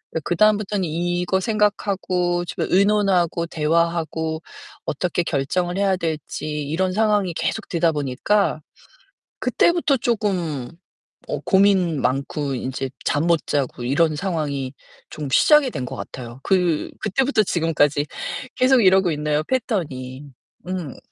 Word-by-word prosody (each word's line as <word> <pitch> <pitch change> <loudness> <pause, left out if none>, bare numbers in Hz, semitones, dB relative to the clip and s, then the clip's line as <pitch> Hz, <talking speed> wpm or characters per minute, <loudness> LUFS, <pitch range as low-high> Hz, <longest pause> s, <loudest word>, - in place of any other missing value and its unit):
으 - - +1
그다음부터는 205 +3 +2
이거 175 +3 0
생각하고 190 -5 0
좀 170 - -3
의논하고 190 -4 +2
대화하고 160 0 0 0.4
어떻게 175 +3 -1
결정을 175 +5 -1
해야 195 -1 +2
될지 160 -3 -4 0.2
이런 180 +6 -1
상황이 210 -3 +2
계속 220 +6 -2
되다 170 -1 +2
보니까 150 +6 0 0.8
그때부터 340 -5 +2
쪼금 185 - -1 0.6
어 - - -2
고민 190 -6 +3
많고 140 +2 -1
인제 130 +1 -4
잠 145 +3 +1
못 170 -2 +2
자고 135 -4 -2
이런 150 +5 +2
상황이 145 -7 -2 0.4
좀 150 -2 -5
시작이 300 - +5
된 130 - -4
것 - - -6
같아요. 125 0 -8
그 180 -5 +1
그때부터 225 +3 +2
지금까지 150 -5 +1 0.5
계속 255 0 +4
이러고 190 -2 +5
있네요 150 0 0
패턴이. 150 - -3 0.4
음. 180 -7 -4
175 Hz, 275 characters per minute, -22 LUFS, 150-195 Hz, 0.8 s, 시작이